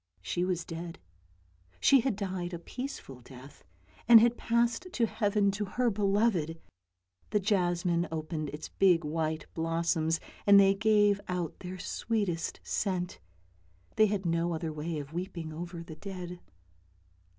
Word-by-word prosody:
She 175 - -1
was 180 -2 -1
dead 165 0 -6 0.4
— 90 0 -34
she 275 - +6
had 255 -3 0
died 185 -3 -3
a - - -4
peaceful 170 - -7
death, 130 +3 -14 0.4
and 230 -1 +10
had 235 +1 +4
passed 235 +6 0
to 235 - +2
heaven 205 -2 +1
to 205 +1 -3
her 240 +4 0
beloved! 195 -5 +1 0.7
The 210 - +2
jasmine 175 -3 +1
opened 155 -1 -3
its 150 +2 -7
big 180 -4 +3
white 155 0 -2
blossoms, 165 0 0 0.3
and 200 0 +9
they 195 0 +6
gave 205 -1 +3
out 180 -3 -3
their 185 0 -7
sweetest 195 -3 -2
scent. 185 -3 -2 0.8
They 215 - +5
had 200 -2 -2
no 170 0 0
other 160 -1 -4
way 155 +2 -4
of 145 +1 -7
weeping 170 -3 -5
over 170 +1 -6
the 160 -1 -10
dead. 180 -1 -7
180 Hz, 145 wpm, -30 LUFS, 165-205 Hz, 0.8 s, and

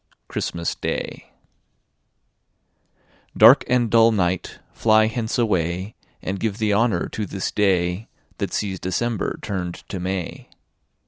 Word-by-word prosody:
Christmas 85 -1 -3
Day - - -5 2.1
Dark - - +8
and 120 -3 +2
dull 115 0 +6
night, 95 -4 -1 0.2
flie 110 -1 +4
hence 115 +2 -2
away, 95 -3 0 0.3
And 95 +1 -3
give 105 -2 -2
the 110 -2 +1
honour 115 +2 +2
to 105 -2 -4
this 95 0 -3
day 95 0 +1 0.3
That - - -2
Sees 95 -3 -2
December 105 +4 -2
turn'd 90 -4 -3
to 95 - -4
May. 90 -1 -4
100 Hz, 120 wpm, -22 LUFS, 90-110 Hz, 2.1 s, Dark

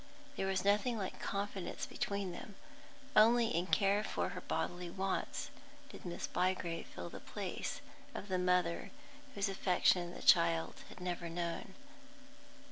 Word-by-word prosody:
There 190 - -1
was 190 0 0
nothing 210 +4 +3
like 190 -3 -4
confidence 200 -2 -3
between 200 -2 -2
them; 195 +3 -8 0.6
only 230 +2 +7
in 175 +2 0
care 200 +1 +3
for - - -1
her - - -6
bodily 175 0 -2
wants 190 +2 -2 0.4
did - - -11
Miss 175 -1 -3
Bygrave 180 -2 0
fill 85 -1 -7
the - - -7
place - - -4 0.3
of 200 - -5
the 185 -2 0
mother 180 -2 +2 0.5
whose 200 0 +1
affection 180 -2 +2
the - - -8
child 165 -1 +5 0.2
had - - -11
never 175 -1 -2
known. 170 +3 -3
185 Hz, 140 wpm, -36 LUFS, 175-200 Hz, 0.6 s, only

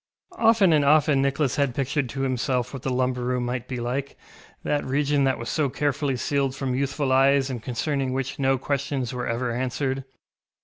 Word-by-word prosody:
Often 225 -6 +5
and 150 -2 +4
often 150 -1 +4
Nicholas 140 0 0
had 140 -4 +1
pictured 135 -1 -1
to 135 +3 -4
himself 125 -1 -1
what 135 - -6
the 135 - -2
lumber 125 0 0
room 125 0 -1
might 125 0 -3
be 125 -2 -4
like, 130 +4 -3 0.5
that 145 - 0
region 140 +1 +1
that 135 - +1
was 115 - -6
so 145 +4 0
carefully 145 0 -1
sealed 135 +1 -1
from 135 -2 -2
youthful 135 +1 -1
eyes 135 +1 +4
and 120 -3 -5
concerning 135 +2 -2
which 135 +1 -3
no 135 -1 +2
questions 135 -1 -2
were 125 -1 -3
ever 120 +1 -1
answered. 130 +2 -2
135 Hz, 185 wpm, -25 LUFS, 125-140 Hz, 0.5 s, Often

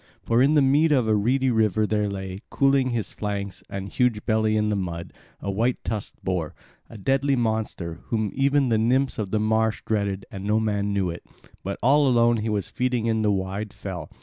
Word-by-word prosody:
For 115 +1 +2
in 145 +4 +4
the 145 - +5
mead 145 +4 +4
of 130 -5 +3
the 110 - +2
reedy 125 +5 +2
river 110 -2 +2
there 105 -1 0
lay, 95 -1 -5
cooling 135 -2 +2
his 115 -5 -3
flanks 100 -2 -4
and 95 0 -5
huge 115 0 0
belly 110 -1 +2
in 105 0 +1
the 105 - +1
mud, 85 -3 -4 0.3
a 100 - -3
white 115 +5 +1
tusked 110 -3 -4
boar, 90 -5 -2 0.3
a 115 - -10
deadly 135 +6 +1
monster, 110 -8 -2
whom 110 -3 -1
even 140 -1 +2
the 110 -2 +2
nymphs 130 +3 +1
of 105 -3 -2
the 110 - 0
marsh 110 +1 +1
dreaded, 100 -3 -1
and 95 -2 -7
no 105 +2 +2
man 105 -2 0
knew 95 -3 0
it; 85 - -9 0.4
but 100 +1 -3
all 140 +3 +5
alone 120 -2 +4
he 110 +1 -2
was 105 -3 -1
feeding 125 -2 -1
in 110 -1 +1
the 105 - +2
wide 100 +1 -2
fell. 90 -6 -7
110 Hz, 205 wpm, -24 LUFS, 100-125 Hz, 0.4 s, the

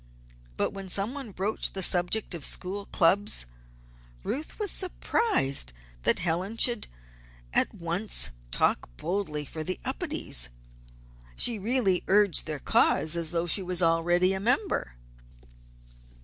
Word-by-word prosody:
But - - 0
when 195 -1 -7
somebody 225 +6 -4
broached 200 +3 -2
the 190 - -1
subject 180 +4 +1
of 165 -4 -2
school 200 +2 -1
clubs, 190 - +2 0.8
Ruth 300 +5 -4
was 415 -3 -3
surprised 245 - -1 0.3
that - - +3
Helen 180 +6 -2
should 240 -1 +2 0.7
at - - +2
once 170 - -1 0.2
talk - - +1
boldly 160 -4 -3
for 155 +3 -7
the 185 +3 -4
Upedes. 270 - 0 0.9
She 235 -3 +5
really 205 -4 +1
urged 200 -3 +4
their 155 -1 -3
cause 155 +3 +1
as 170 -2 -1
though 170 0 -1
she 175 +4 +2
was 180 -1 +2
already 175 +3 +3
a 190 - -2
member. 240 - +3
185 Hz, 125 wpm, -27 LUFS, 165-220 Hz, 0.9 s, She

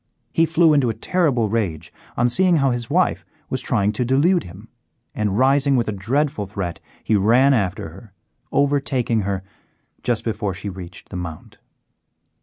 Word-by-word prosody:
He 165 0 +3
flew 165 -1 +4
into 140 -5 +3
a 115 - -2
terrible 145 -11 +1
rage 95 -7 -2 0.2
on 120 - +3
seeing 180 +8 +3
how 135 -4 +2
his 120 -1 -3
wife 180 +4 +1 0.3
was 130 - 0
trying 105 -6 +1
to 110 +4 -2
delude 145 +9 +2
him, 95 +6 -12 0.5
and, 105 -2 -1
rising 135 +2 +3
with 120 -2 +1
a - - 0
dreadful 110 +2 -1
threat, 95 -4 -4 0.2
he 110 - +1
ran 120 +7 +4
after 100 -8 -1
her, 95 +6 -14 0.4
overtaking 135 -5 +1
her 100 -2 -2 0.6
just 120 -3 -1
before 105 -4 -2
she 100 +2 -5
reached 95 -1 -10
the 90 - -6
Mount. 85 -3 -8
115 Hz, 165 wpm, -21 LUFS, 100-140 Hz, 0.6 s, flew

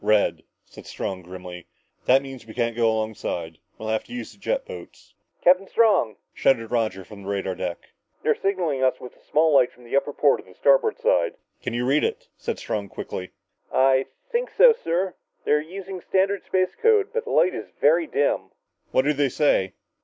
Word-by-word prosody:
"Red!" 105 -1 +2 0.2
said - - -14
Strong 95 -1 -4
grimly, 90 -1 -9 0.4
"That 135 +2 +5
means 135 -4 -10
we 110 - -11
can't 120 -2 0
go 115 -1 +3
alongside. 105 -7 -3 0.2
We'll 110 - -5
have 110 0 0
to 240 - -11
use 245 - -6
jet - - -2
boats." - - -11 0.3
"Captain 185 +2 +5
Strong," 210 - +3 0.2
shouted 115 -4 +1
Roger 110 -5 0
from 105 -2 -12
the 100 - -7
radar 100 -1 -1
deck, 85 -1 -6 0.3
"they're - - +4
signaling 175 -9 -1
us 130 -1 +2
with 125 - -10
a - - -26
small 155 +1 +3
light 130 -3 +5
from 125 - -20
the 120 - -4
upper 140 +1 +2
port 145 0 +2
on - - -24
the 90 - -17
starboard 140 -1 +3
side!" 85 -1 +2 0.3
"Can - - -3
you 120 +1 0
read 140 +4 +3
it?" - - -2 0.2
asked - - -1
Strong 100 -2 -4
quickly. 95 -1 -6 0.4
"I 130 0 +3 0.2
think 485 +1 0
so, - - +7
sir. 185 - -1 0.3
They're 150 0 +3
using 185 +3 -8
standard 195 +2 +1
space 185 -1 +1
code, 430 -2 +4
but 470 0 -2
the - - -6
light 185 - +3
is - - -6
very 165 +3 +4
dim." 145 0 0 0.4
"What 130 - +2
do 150 - +3
they 145 -1 +1
say?" 110 -10 +2
135 Hz, 195 wpm, -24 LUFS, 110-180 Hz, 0.4 s, so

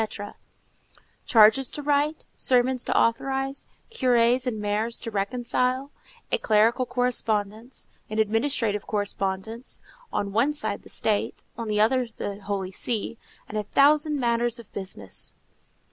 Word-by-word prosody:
—charges 225 +3 +6
to 295 - -6
write, 295 +2 +1
sermons 255 0 +2
to - - 0
authorize, 270 +4 0 0.2
curés 250 - +3
and 220 -4 -2
mayors 210 +3 0
to 230 - -5
reconcile, 250 +6 -1 0.4
a - - +2
clerical 230 +4 +3
correspondence, 230 -2 -1 0.2
an 215 - -4
administrative 220 -1 +1
correspondence; 205 +3 -3 0.3
on 200 -1 -2
one 250 +8 +2
side 295 - -2
the - - -15
State, 210 -2 -1
on 230 -1 -5
the 210 -1 0
other 245 +3 +3
the 200 0 -5
Holy 195 -2 -3
See; 225 +3 -3 0.3
and 215 - -3
a - - -2
thousand 295 +6 +3
matters 235 -1 +1
of 235 -3 -13
business. 185 - -5
230 Hz, 130 wpm, -25 LUFS, 210-255 Hz, 0.4 s, charges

